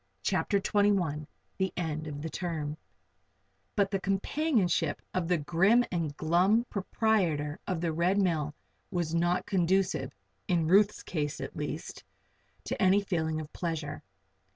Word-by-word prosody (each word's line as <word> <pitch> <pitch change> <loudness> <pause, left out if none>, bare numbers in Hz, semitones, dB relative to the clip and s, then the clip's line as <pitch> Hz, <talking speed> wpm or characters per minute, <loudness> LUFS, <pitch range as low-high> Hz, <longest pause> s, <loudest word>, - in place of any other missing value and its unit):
CHAPTER 200 - +1
XXI 195 -8 +1 0.3
THE 190 0 +1
END 155 -3 -2
OF 145 -1 -6
THE 160 - -3
TERM 155 -4 -3 1.0
But 200 -1 +2
the 195 -2 -1
companionship 195 - +1
of 185 -2 0
the 180 0 +3
grim 190 +11 +3
and 160 -5 -2
glum 185 +9 +3
proprietor 185 -8 0
of 180 -4 -1
the 165 -2 0
Red 175 +4 +2
Mill 160 -6 +1 0.3
was 175 -4 -2
not 175 +2 +1
conducive 185 -6 +1 0.4
in 170 -3 +2
Ruth's 200 +4 +4
case, 150 -4 -3
at - - -6
least - - -5 0.6
to - - -4
any 190 +2 +5
feeling 160 -5 -1
of 155 -1 -8
pleasure. 160 -4 -3
175 Hz, 135 wpm, -30 LUFS, 155-195 Hz, 1.0 s, any